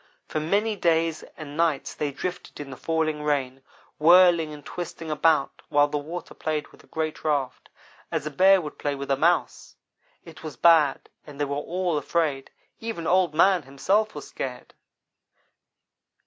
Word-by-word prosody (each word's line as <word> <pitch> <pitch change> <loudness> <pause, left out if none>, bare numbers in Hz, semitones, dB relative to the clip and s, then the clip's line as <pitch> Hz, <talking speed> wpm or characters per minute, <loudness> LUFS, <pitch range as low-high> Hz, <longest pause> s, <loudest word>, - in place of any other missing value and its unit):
For 155 - -2
many 205 +8 0
days 165 -3 +1 0.2
and 150 -2 -8
nights 160 -3 0
they 150 - -2
drifted 180 +6 -6
in 145 -2 -7
the - - -7
falling 155 0 -1
rain; 135 -3 -1 0.4
whirling 170 -1 +6
and 150 -1 -11
twisting 170 -2 -6
about 155 -1 +1
while 145 0 +4
the 145 0 -2
water 165 +5 -7
played 155 -2 -3
with - - -19
the - - -23
great 155 -1 -4
raft, 145 -4 -2 0.4
as - - -2
a 155 - -3
Bear 190 +6 +5
would 150 -3 -8
play 145 -1 -1
with 140 0 -5
a - - +4
Mouse. 170 +6 0 0.5
It 165 -2 -12
was 155 -6 -8
bad, 160 -5 +4 0.2
and 145 -1 -11
they 145 - +1
were 140 0 -3
all 170 +2 -1
afraid 145 -2 -1 0.3
even 225 -7 -5
Old 180 -3 +2
man 185 +2 +4
himself 195 +11 0
was - - -7
scared. - - -6
155 Hz, 165 wpm, -25 LUFS, 145-170 Hz, 0.5 s, whirling